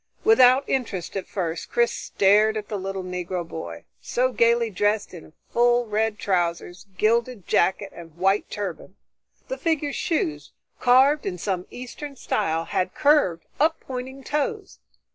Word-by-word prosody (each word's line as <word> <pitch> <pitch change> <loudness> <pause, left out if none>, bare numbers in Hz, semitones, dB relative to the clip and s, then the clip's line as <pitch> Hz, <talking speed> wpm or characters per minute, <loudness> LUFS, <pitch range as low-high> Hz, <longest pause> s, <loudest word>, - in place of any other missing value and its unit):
Without 260 - +6
interest 210 -10 -2
at 195 - -4
first, 170 -4 -4
Chris 235 0 +2
stared 210 +2 +2
at 210 - -6
the 205 - -3
little 190 0 -4
Negro 180 -1 -4
boy, 85 - -7 0.2
so 255 +1 0
gaily 235 -1 +2
dressed 205 +2 0
in 165 -3 -12 0.2
full 240 0 +3
red 215 0 -1
trousers, 175 0 -2
gilded 230 -1 +1
jacket 195 +3 +1
and 165 -2 -12
white 195 +3 +1
turban. 190 -2 -6 0.5
The - - -5
figure's 310 -4 -1
shoes, 150 - -2 0.3
carved 265 +3 +4
in 180 -2 -3
some 185 0 -3
Eastern 275 +3 -8
style, 165 -9 -1
had 185 0 -2
curved 285 - +3
up 320 +2 +2
pointing 265 +1 -7
toes. 345 +10 -3
210 Hz, 145 wpm, -24 LUFS, 180-255 Hz, 0.5 s, Without